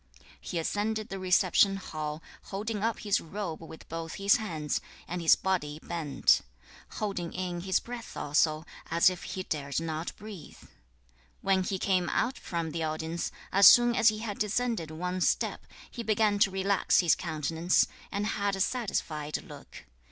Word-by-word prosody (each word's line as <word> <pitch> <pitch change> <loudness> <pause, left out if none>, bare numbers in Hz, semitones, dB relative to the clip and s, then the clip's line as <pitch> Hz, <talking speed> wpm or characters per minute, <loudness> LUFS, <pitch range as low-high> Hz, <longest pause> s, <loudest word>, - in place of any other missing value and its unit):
4. - - -26 0.2
He 175 - -4
ascended 210 +6 -1
the 195 +1 -5
reception 185 +1 +4
hall, 155 -4 -5 0.2
holding 210 +1 -4
up 230 0 0
his 205 -2 +1
robe 170 -2 -5
with 160 -1 -11
both 165 0 -5
his 200 +1 +4
hands, 160 -10 -2 0.3
and 175 +1 -4
his 165 - +6
body 155 -6 -2
bent; 155 -6 +2 0.5
holding 195 -5 -3
in 180 -1 -3
his 190 +1 +1
breath 240 -1 -8
also, 155 +2 +1 0.2
as 170 +3 +5
if 180 - -7
he 185 - -5
dared 140 -4 -2
not 160 0 -4
breathe. 205 -5 -10
5. - - -18 0.7
When 190 -1 +2
he 190 +1 -2
came 185 -2 +1
out 255 +3 0
from 170 -3 -3
the 165 - -3
audience, 160 +2 -2 0.2
as 195 +1 +8
soon 240 0 +7
as 225 - +6
he 215 - -3
had 215 -2 -5
descended 215 -5 -1
one 180 +3 -3
step, - - 0 0.2
he 240 - -5
began 215 -2 +2
to 200 - +5
relax 195 +1 +2
his 175 - +4
countenance, 165 +1 +1 0.3
and 200 +1 -1
had 200 -2 0
a - - -6
satisfied 165 - -2
look. - - -12
185 Hz, 165 wpm, -29 LUFS, 160-205 Hz, 0.7 s, as